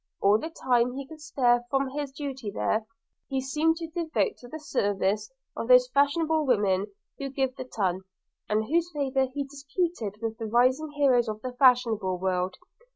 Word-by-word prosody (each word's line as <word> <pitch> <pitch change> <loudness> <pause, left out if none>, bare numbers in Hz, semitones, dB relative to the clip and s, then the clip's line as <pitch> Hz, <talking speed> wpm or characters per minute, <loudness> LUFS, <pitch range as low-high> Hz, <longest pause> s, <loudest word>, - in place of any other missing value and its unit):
– - - -60
All 205 +2 +4
the 320 - -5
time 250 -5 +1
he 275 +1 -5
could 315 0 -12
spare 245 -5 +2
from 270 -1 +1
his 285 0 -4
duty 270 -5 -5
there, 215 +2 -1 0.4
he 270 - 0
seemed 300 +5 +1
to 330 -1 -5
devote 335 +6 -1
to 245 - -12
the 310 - -7
service 205 -6 0 0.3
of 230 - -4
those 250 0 +6
fashionable 310 +4 +2
women 205 -7 +2 0.3
who 275 -1 -3
give 265 -1 -1
the 255 - -6
ton, 190 -6 -1 0.5
and 215 +1 +2
whose 335 +6 +1
favour 270 -2 +1
he 285 +1 -2
disputed 275 - -3
with 225 0 -4
the 225 - -3
rising 255 +7 +2
heroes 255 -5 +3
of 215 0 -6
the 255 - -3
fashionable 240 -7 +3
world. 185 0 -1
255 Hz, 180 wpm, -27 LUFS, 220-285 Hz, 0.5 s, those